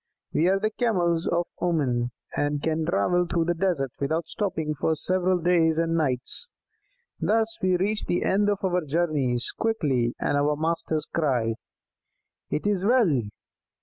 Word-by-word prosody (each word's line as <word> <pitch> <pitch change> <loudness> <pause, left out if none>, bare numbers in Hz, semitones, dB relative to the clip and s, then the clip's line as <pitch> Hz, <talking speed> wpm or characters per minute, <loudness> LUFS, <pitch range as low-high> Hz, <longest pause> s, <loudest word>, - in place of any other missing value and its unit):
We 165 - +2
are 195 +1 +3
the 215 +2 0
Camels 180 -8 0
of 170 0 +1 0.2
Oman, 130 -9 0 0.3
and 145 0 -1
can 160 0 -1
travel 175 - +1
through 170 -1 0
the 175 - +1
desert 165 -7 -1
without 160 +4 -1
stopping 165 -5 -2
for 160 +2 0
several 185 +3 +1
days 165 -2 +2
and 165 0 +1
nights. 145 - +1 0.7
Thus 225 +1 +1
we 185 -1 +2
reach 205 +4 0
the 175 - 0
end 205 +2 +2
of 205 -1 -1
our 180 -2 +1
journeys 145 -6 +1
quickly, 135 - 0
and - - 0
our 145 +1 +2
masters 160 0 -1
cry: 125 -8 0 1.0
'It 150 - -2
is 200 -3 +1
well!' 205 - +3
165 Hz, 150 wpm, -25 LUFS, 150-185 Hz, 1.0 s, are